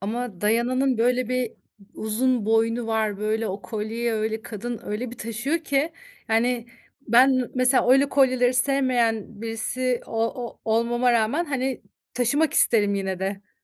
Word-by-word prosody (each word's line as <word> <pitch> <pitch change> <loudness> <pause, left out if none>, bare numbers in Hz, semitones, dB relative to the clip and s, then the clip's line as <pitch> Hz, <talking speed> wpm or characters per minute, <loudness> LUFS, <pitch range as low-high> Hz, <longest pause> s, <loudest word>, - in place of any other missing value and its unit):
Ama 215 -1 -4
Diana'nın 240 +4 +1
böyle 250 +1 +1
bir 255 -2 -1 0.4
u - - -9
uzun 230 +1 0
boynu 225 +1 +1
var. 220 -3 -1
Böyle 215 +1 -1
o 195 +2 -5
kolyeyi 225 +2 -3
öyle, 220 0 -2
kadın 230 +2 -6
öyle 225 +4 -4
bir 245 - -11
taşıyor 240 +8 -2
ki 310 0 -1 0.4
Yani 235 +1 +1 0.4
ben, 245 +4 +6
eee, 255 -2 -1
mesela 255 0 +3
öyle 270 +2 +5
kolyeleri 255 -3 +3
sevmeyen 245 -5 0
birisi 240 +2 -2
o - - -11 0.3
ol 235 - -9
olmama 240 +2 +2
rağmen, 235 +9 +1
hani, 265 -4 -2 0.3
taşımak 280 +6 +1
isterim 205 -3 +3
yine 190 -2 -2
de. 195 +1 -5
235 Hz, 150 wpm, -24 LUFS, 220-255 Hz, 0.4 s, ben